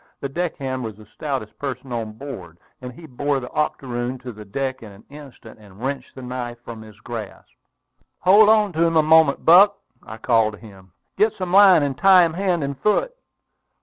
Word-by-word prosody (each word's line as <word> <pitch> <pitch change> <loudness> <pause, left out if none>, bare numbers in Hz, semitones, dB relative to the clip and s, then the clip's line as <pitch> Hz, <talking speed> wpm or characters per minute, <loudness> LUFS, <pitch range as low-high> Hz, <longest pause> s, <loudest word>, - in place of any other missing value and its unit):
The 140 - -5
deckhand 135 -5 -4
was 110 -3 -6
the 110 +1 -16
stoutest 115 0 -6
person 130 -2 -6
on 115 -2 -4
board, 105 - -10 0.2
and 125 0 -7
he 160 +7 -14
bore 145 0 -2
the 125 - -9
octoroon 125 -4 -3
to 125 - -7
the 105 -1 -11
deck 130 +6 -4
in 110 -3 -11
an 100 +2 -17
instant, 140 -7 -13
and 100 -2 -17
wrenched 135 +3 -5
the 130 - -10
knife 125 -1 -6
from 115 -2 -9
his 110 -1 -15
grasp. 110 -3 -8 0.7
"Hold 205 +3 +6
on 210 -3 +3
to 160 +1 +1
him 165 -1 +1
a 155 - +4
moment, 160 -2 +3
Buck!" 200 +5 +6 0.2
I 110 - -10
called 115 -1 +1
to 105 - -12
him. 95 -5 -16 0.2
"Get 215 +2 +2
some 185 -4 -5
line, 195 -5 +6
and 140 -2 -2
tie 185 +5 +5
him 165 - -3
hand 180 -3 -1
and 140 -1 -5
foot!" - - 0
135 Hz, 200 wpm, -21 LUFS, 115-165 Hz, 0.7 s, Hold